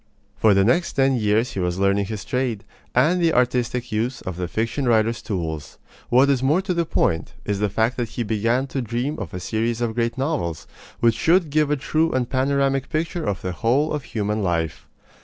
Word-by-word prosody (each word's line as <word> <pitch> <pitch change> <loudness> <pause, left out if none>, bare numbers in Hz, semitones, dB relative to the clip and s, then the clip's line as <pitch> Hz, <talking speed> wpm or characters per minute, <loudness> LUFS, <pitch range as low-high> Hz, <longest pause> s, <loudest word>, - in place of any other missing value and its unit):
For 110 -3 +4
the 100 - +4
next 170 - +2
ten 135 -1 +3
years 110 +1 +1
he - - -4
was 90 -1 -1
learning 100 +1 +2
his 110 -1 -5
trade, 125 -5 -1 0.3
and 180 +3 +3
the 165 -2 +3
artistic 125 -1 0
use 115 +4 -1
of 95 - -5
the 90 0 -3
fiction 115 - -2
writer's 115 -1 +2
tools. 80 -7 -4 0.3
What 130 +3 +5
is 130 -3 +1
more 150 +8 +2
to 190 -1 -1
the 170 -1 0
point, 80 - 0
is 100 -1 -1
the 105 0 +1
fact 110 +5 0
that 120 -3 -2
he 120 - -3
began 115 +4 0
to 135 - 0
dream 120 +5 -2
of 100 -6 -5
a 90 - -5
series 115 +5 -1
of 120 -2 -1
great 115 +1 -1
novels, 130 - -2 0.4
which 115 -1 +5
should 165 +6 +2
give 150 0 +2
a 150 - +1
true 160 +4 +1
and 125 -2 0
panoramic 135 0 +1
picture 165 +1 -2
of 100 - -3
the 90 - -2
whole 120 - +1
of 150 -3 -3
human 105 0 -2
life. 85 -4 -2
120 Hz, 210 wpm, -22 LUFS, 105-135 Hz, 0.4 s, What